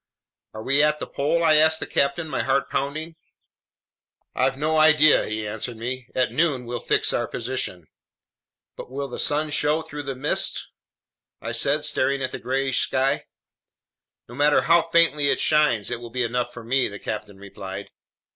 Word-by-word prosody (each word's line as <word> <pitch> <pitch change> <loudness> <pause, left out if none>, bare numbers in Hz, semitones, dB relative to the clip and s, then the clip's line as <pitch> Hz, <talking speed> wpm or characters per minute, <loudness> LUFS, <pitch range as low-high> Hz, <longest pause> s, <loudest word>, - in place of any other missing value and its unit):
"Are 110 - -7
we 140 +4 +3
at 150 0 +2
the - - -4
pole?" 160 +4 -1
I 155 -2 +5
asked 160 +1 +4
the - - -4
captain, 140 +4 0
my - - -2
heart 135 +1 0
pounding. 155 +4 -3 1.2
"I've 130 +1 0
no 155 +2 0
idea," 155 -1 +5
he 110 0 -4
answered 110 +3 -5
me. 125 +2 -5
"At 130 -3 +1
noon 140 -2 0
we'll 120 0 -4
fix - - +1
our - - -1
position." 115 -8 -4 0.9
"But - - -9
will 140 +2 -4
the 125 - -7
sun 150 +1 +1
show 150 +2 +1
through 150 -1 -7
this 135 -2 -6
mist?" 145 +3 -1 0.7
I 115 - -5
said, 140 +6 +1
staring 140 -2 0
at 130 - -2
the - - -6
grayish 135 +1 0
sky. 135 +2 0 1.0
"No 120 - -12
matter 145 +3 +3
how 165 0 +3
faintly 165 -4 +3
it - - +2
shines, 150 -9 +2
it 120 - -3
will 120 0 -9
be 125 +2 -1
enough 120 +1 -2
for 120 -1 -10
me," 130 +3 +1
the 100 - -8
captain 105 0 -6
replied. 100 0 -9
135 Hz, 175 wpm, -23 LUFS, 120-150 Hz, 1.2 s, I